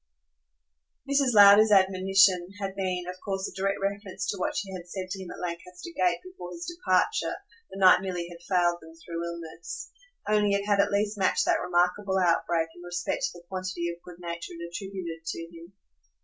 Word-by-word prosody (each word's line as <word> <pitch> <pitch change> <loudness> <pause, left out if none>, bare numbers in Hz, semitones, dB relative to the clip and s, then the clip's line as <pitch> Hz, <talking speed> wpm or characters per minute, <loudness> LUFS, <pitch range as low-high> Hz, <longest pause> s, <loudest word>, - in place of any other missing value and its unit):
Mrs. 275 -3 +2
Lowder's 205 +1 +8
admonition 190 -1 +4
had 195 -1 -4
been 185 -2 -1
of 180 0 -6
course 195 -1 -2
a - - -9
direct 195 +1 0
reference 200 0 -3
to 200 - -1
what - - -1
she 200 -2 -3
had 175 -1 -8
said 185 0 -5
to 190 0 -4
him 185 - -8
at - - -8
Lancaster 180 - -6
Gate 360 - +1
before 365 - -9
his 170 0 -7
departure 345 +1 +1 0.3
the - - -9
night 185 -1 +7
Milly 180 -3 -3
had 170 -1 -12
failed 175 -2 +2
them 160 0 -14
through 165 0 -6
illness; 170 -1 -7 0.4
only 210 -1 +3
it 200 0 -1
had 205 -1 +2
at 200 +1 +4
least 205 +1 0
matched 190 - +2
that - - +2
remarkable 180 +3 +1
outbreak 170 -2 +2
in 175 - -13
respect 175 0 -3
to - - -5
the 170 - -16
quantity 185 -2 -3
of 170 0 -11
good 175 -1 -12
nature 170 -1 -6
it 170 0 -7
attributed 175 -3 -6
to 165 - -4
him. 170 +3 -13
185 Hz, 190 wpm, -27 LUFS, 175-200 Hz, 0.4 s, Lowder's